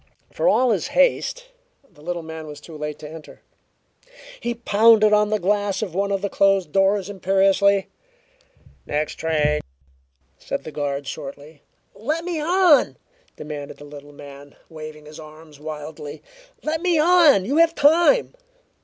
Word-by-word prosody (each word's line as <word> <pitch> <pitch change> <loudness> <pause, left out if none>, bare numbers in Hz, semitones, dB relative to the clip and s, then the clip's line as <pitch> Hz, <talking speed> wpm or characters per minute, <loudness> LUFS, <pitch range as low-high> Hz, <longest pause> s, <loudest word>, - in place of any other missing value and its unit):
For - - 0
all 255 -1 +3
his - - -1
haste, - - +1 0.4
the 150 - -22
little 170 +1 -4
man 160 -1 -8
was 150 -1 -9
too 160 +2 -13
late 150 0 -5
to 150 - -10
enter. 160 0 -12 1.0
He 240 0 -3
pounded 220 -1 +4
on 210 0 +3
the 215 - +1
glass 205 +1 -1
of 190 -6 -6
one 200 +2 -1
of 195 0 -2
the - - +1
closed 195 -5 +2
doors 195 +1 +2
imperiously. 195 0 +2 1.0
"Next 150 +1 -2
train," 150 -2 0 0.8
said - - -5
the 155 - -8
guard 140 -1 -3
shortly. 145 +1 -9 0.3
"Let 310 +10 -3
me 345 -3 -3
on!" 345 -2 +3 0.4
demanded 150 -2 -8
the 145 - -12
little 145 0 -12
man, 145 0 -13
waving 155 -1 -10
his 150 +1 -12
arms 155 -1 -14
wildly. 150 -1 -8 0.4
"Let 315 +1 -2
me 350 -2 +1
on! 310 - +5
You 280 +7 -1
have 335 0 +4
time!" 340 +13 +4
190 Hz, 150 wpm, -22 LUFS, 150-235 Hz, 1.0 s, on